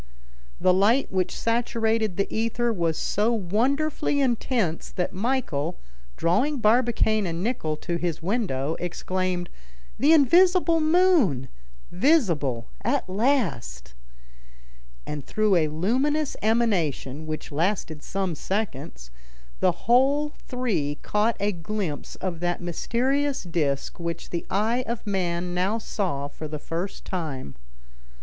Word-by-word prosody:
The 185 - +4
light 215 +8 +3
which 185 -1 -1
saturated 225 -3 0
the 200 - +2
ether 230 +1 0
was 170 -5 0
so 210 +3 +1
wonderfully 265 - 0
intense, 235 - 0
that 180 0 -2
Michel, 205 - -1 0.4
drawing 260 - +2
Barbicane 220 -3 +2
and 170 +1 -3
Nicholl 160 -10 -1
to 170 -2 -2
his 170 -2 -2
window, 165 - -1
exclaimed, 180 0 -2 0.5
"The 285 +6 +5
invisible 340 +3 +5
moon, 310 - +3 0.4
visible 175 - +2 0.2
at - - 0
last!" 185 - -1 1.1
And 150 -2 -5
through 215 +3 +2
a 160 -3 +3
luminous 260 - 0
emanation, 175 - 0
which 155 0 -5
lasted 160 -1 -1
some 190 0 -2
seconds, 150 - -4 0.5
the - - 0
whole 280 +5 +3
three 195 - -1
caught 215 +2 +1
a 205 +1 +1
glimpse 175 -3 -4
of 180 -3 -4
that 175 0 -1
mysterious 260 - 0
disc 155 -6 -1
which 170 -1 -5
the 170 - -3
eye 225 +6 +1
of 235 -1 -4
man 180 -3 -1
now 185 +5 +1
saw 180 -11 -2
for 155 +2 -7
the 150 0 -5
first 170 +6 -5
time. 150 - -4
195 Hz, 120 wpm, -25 LUFS, 165-240 Hz, 1.1 s, The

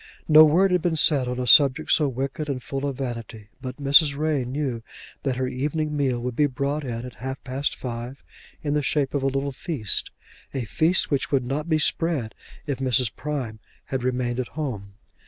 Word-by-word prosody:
No 155 0 +9
word 180 +5 +4
had 180 -1 +2
been 175 -1 0
said 145 -4 +4
on 125 0 -3
a 125 - -1
subject 140 +3 +5
so 150 - +4
wicked 135 +4 -3
and 130 -3 -3
full 135 +1 -3
of 135 -2 -4
vanity, 115 -5 -6
but 130 -1 -6
Mrs. 140 0 +5
Ray 150 -4 0
knew 130 -2 -3 0.4
that 135 -2 -1
her 130 0 -1
evening 150 +4 -2
meal 135 -4 0
would 125 0 -4
be 145 +2 +3
brought 140 +2 -2
in 120 -2 -4
at 125 - -8
half 130 +4 -6
past 135 +2 -2
five 120 +2 -6 0.4
in 145 -1 -1
the 150 - +2
shape 140 -1 0
of 140 - 0
a 135 - +1
little 135 +1 -1
feast, 130 - -3 0.5
a 130 -3 -2
feast 160 - +2
which 140 - 0
would 135 -3 +1
not 150 +6 -3
be 155 - +3
spread 155 -6 0 0.3
if 140 -3 -3
Mrs. 125 -3 +1
Prime 130 -7 -4 0.3
had 130 -2 -3
remained 125 -1 -1
at 125 - -2
home. 105 -10 -4
135 Hz, 200 wpm, -24 LUFS, 125-150 Hz, 0.5 s, No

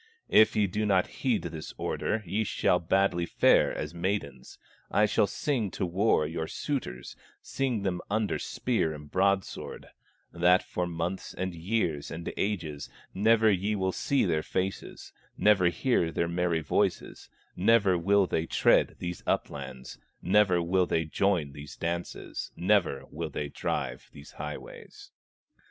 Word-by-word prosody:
If 110 - +6
ye 105 - +3
do 105 +3 -2
not 95 -3 +3 0.2
heed 125 -5 +1
this 80 -2 -7
order, 110 +1 -2
Ye 100 +6 0
shall - - +1
badly 90 0 +1
fare - - +4
as - - -5
maidens; 85 -8 -3 0.3
I 105 - +3
shall 105 0 +2
sing 115 0 -1
to 95 - 0
war 90 -1 +2
your 80 +1 -3
suitors, 100 - -4 0.3
Sing 125 -6 -2
them 90 -3 -1
under 105 -3 0
spear 110 -11 -1
and 75 -1 -12
broadsword, 95 0 -1 0.4
That 90 +2 +4
for 90 0 -3
months, 85 +2 -4
and 95 0 -3
years, 85 -4 -1
and 85 +1 -5
ages, 80 -9 -3 0.2
Never 110 +2 +4
ye 100 +3 0
will 95 -2 0
see 140 +6 +1
their 80 -4 +1
faces, 95 +4 -4 0.2
Never 100 -4 +4
hear 85 -1 +1
their 85 - 0
merry 85 -1 0
voices, 75 - -1 0.3
Never 100 -1 +4
will 100 +3 +3
they 80 -2 -1
tread - - +3
these 90 0 -5
uplands, 65 -2 -3 0.2
Never 95 -2 +3
will 90 +1 +2
they 80 - 0
join 85 -2 0
these 70 +1 -10
dances, 85 +1 -4
Never 90 -8 +1
will - - -4
they 75 - -4
drive 60 -3 -3
these 70 +1 -13
highways." 75 0 -9
90 Hz, 145 wpm, -28 LUFS, 80-105 Hz, 0.4 s, If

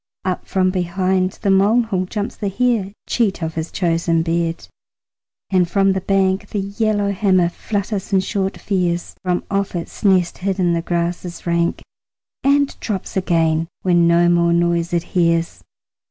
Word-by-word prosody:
Up 185 -1 -2
from 185 -1 +1
behind 185 +1 0
the 200 - +3
molehill 200 0 +2
jumps 205 +1 -4
the 205 - -3
hare, 225 -2 0
Cheat 205 -7 0
of 160 0 -3
his 160 +1 -4
chosen 165 -2 +1
bed, 165 0 -2 0.8
and 180 -2 +3
from 195 +1 +3
the 190 0 -1
bank 195 +1 +1
The - - -4
yellowhammer 200 -3 +1
flutters 200 +2 -4
in 190 -1 +3
short 195 0 -2
fears 175 -3 -1
From 180 -1 0
off 200 -1 -1
its 170 - -6
nest 185 -4 +2
hid 195 +1 -2
in 175 -2 +2
the 170 - 0
grasses 175 +1 -3
rank, 170 0 0 0.6
And 280 0 +2
drops 200 -4 -4
again 165 -3 +1 0.2
when 175 -2 +4
no 170 +1 +4
more 170 0 +3
noise 170 0 +1
it 170 -1 0
hears. 170 -2 0
185 Hz, 155 wpm, -19 LUFS, 170-195 Hz, 0.8 s, when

